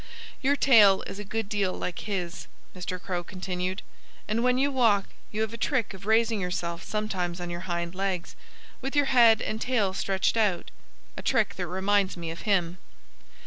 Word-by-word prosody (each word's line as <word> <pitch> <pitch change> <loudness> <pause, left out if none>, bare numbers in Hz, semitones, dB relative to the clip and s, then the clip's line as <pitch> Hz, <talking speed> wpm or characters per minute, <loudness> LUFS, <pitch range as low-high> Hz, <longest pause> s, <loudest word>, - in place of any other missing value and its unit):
"Your 280 +1 +3
tail 215 -9 +6
is 195 - -7
a - - -4
good 220 +1 -3
deal 200 -3 0
like 180 - -4
his," 180 -3 -3 0.3
Mr. 180 0 -4
Crow 180 -1 -3
continued. 185 +1 -4 0.4
"And 225 +2 0
when 250 0 +3
you 280 +2 +2
walk 225 -7 +3 0.2
you 215 - -2
have 220 0 -1
a - - -5
trick 235 -3 0
of 195 +1 -11
raising 225 -1 +3
yourself 170 -2 -3
sometimes 185 -5 -3
on 175 0 -5
your 175 +2 -6
hind 170 0 -2
legs, 190 -2 -3 0.5
with 270 +2 -4
your 290 -1 +4
head 230 -4 +6
and 220 +1 -3
tail 220 -7 +1
stretched 195 +3 0
out 205 -6 +1 0.5
a - - -4
trick - - +1
that - - -4
reminds 190 +1 +1
me 165 -1 -4
of 165 - -8
him." 180 -3 +1
195 Hz, 185 wpm, -27 LUFS, 180-225 Hz, 0.5 s, tail